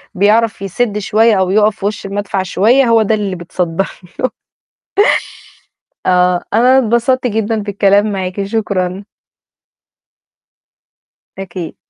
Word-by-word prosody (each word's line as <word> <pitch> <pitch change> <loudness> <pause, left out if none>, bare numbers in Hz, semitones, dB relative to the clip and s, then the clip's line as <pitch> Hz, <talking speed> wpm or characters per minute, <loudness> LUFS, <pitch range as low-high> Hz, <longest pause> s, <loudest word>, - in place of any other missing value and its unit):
بيعرف 210 +3 +2
يسِد 210 +3 -2
شوية 215 0 +2
أو 185 - +1
يقَف 210 +2 +2
في 195 - -5
وِش 205 0 -3
المدفع 195 -1 -3
شوية 225 +8 +3
هو 230 -1 +4
ده 220 +1 +1
اللي 200 -3 -3
بيتصدّر 175 +1 -2 0.3
له. 255 - 0 1.8
آه، 180 -1 +2
أنا 250 +4 +4
اتبسطت 245 +1 +1
جدًا 225 0 -1
بالكلام 205 0 +1
معاكِ 190 0 -3
شكرًا. 195 -3 -2 2.3
أكيد. 185 -3 -7
205 Hz, 110 wpm, -15 LUFS, 190-225 Hz, 2.3 s, هو